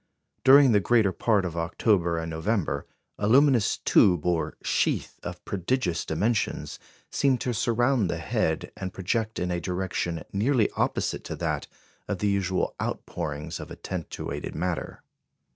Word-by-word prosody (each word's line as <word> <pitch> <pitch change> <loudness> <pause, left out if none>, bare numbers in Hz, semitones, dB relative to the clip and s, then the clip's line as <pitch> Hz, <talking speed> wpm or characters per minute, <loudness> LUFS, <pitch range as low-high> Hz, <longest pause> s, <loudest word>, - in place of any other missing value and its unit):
During 135 0 +8
the 105 - +5
greater 110 -1 +3
part 100 +1 +1
of 85 -2 -4
October 85 +1 +1
and 80 0 -3
November, 85 +4 -1 0.3
a 105 - 0
luminous 130 -2 +4
"tube" 90 -6 +4
or 85 -2 0
"sheath," - - 0
of - - -7
prodigious 90 -2 -1
dimensions, 105 +7 -1 0.3
seemed 135 -3 +2
to 125 - -1
surround 120 -1 +2
the 85 - -1
head, 80 - -1
and 95 -1 -5
project 110 +4 -1
in 90 0 -1
a 85 -1 -1
direction 90 -2 -2
nearly 110 +2 +2
opposite - - -1
to - - -4
that - - -2 0.4
of - - -2
the 105 - 0
usual 95 -2 0
outpourings 75 +3 -4
of - - -8
attentuated 90 -4 -5
matter. 90 -2 -3
95 Hz, 145 wpm, -26 LUFS, 85-115 Hz, 0.4 s, During